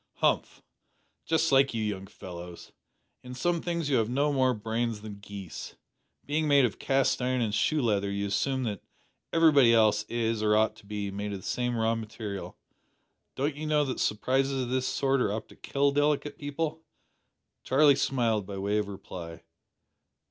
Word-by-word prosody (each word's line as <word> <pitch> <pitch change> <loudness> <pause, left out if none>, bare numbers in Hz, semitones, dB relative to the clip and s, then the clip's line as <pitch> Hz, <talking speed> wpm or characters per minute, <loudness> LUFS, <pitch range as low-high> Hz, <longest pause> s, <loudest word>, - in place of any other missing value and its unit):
"Humph! - - 0 0.6
Just 165 -1 +2
like 135 -2 +4
you 110 - -1
young 100 -2 -3
fellows. 90 -3 -10 0.5
In 125 0 -9
some 170 +5 0
things 170 -3 -2
you 140 -3 +2
have 110 -1 +1
no 145 +4 +1
more 130 -2 +2
brains 115 0 -2
than 105 -2 -8
geese. 100 -3 -8 0.5
Being 155 +2 0
made 140 -2 +5
of 115 - -3
cast 135 -1 +1
iron 130 0 0
and 110 -3 0
shoe 150 +6 +1
leather 100 -3 +1
you 100 0 -2
assume 130 +7 0
that 105 -5 -3 0.5
everybody 145 -8 +6
else 110 -2 +4
is, 115 -2 -1
or 105 0 +3
ought 110 +1 +2
to 100 - -17
be, 105 -1 -3
made 100 +1 -4
of 100 - -5
the - - -13
same 125 -1 -1
raw 115 0 +2
material. 110 -3 -6 0.8
Don't 140 +3 0
you 155 +1 -5
know 150 -1 +3
that 130 - -3
surprises 135 +5 +1
of 120 - -5
this 130 0 0
sort 135 -1 +1
are 100 - +1
apt 110 +1 -4
to - - -15
kill 140 0 0
delicate 145 0 +1
people?" 155 +2 -3 0.8
Charlie 145 +2 +5
smiled 115 -7 0
by 100 -1 -6
way 100 +2 0
of 105 - -2
reply. 90 -4 -8
120 Hz, 175 wpm, -28 LUFS, 105-140 Hz, 0.8 s, everybody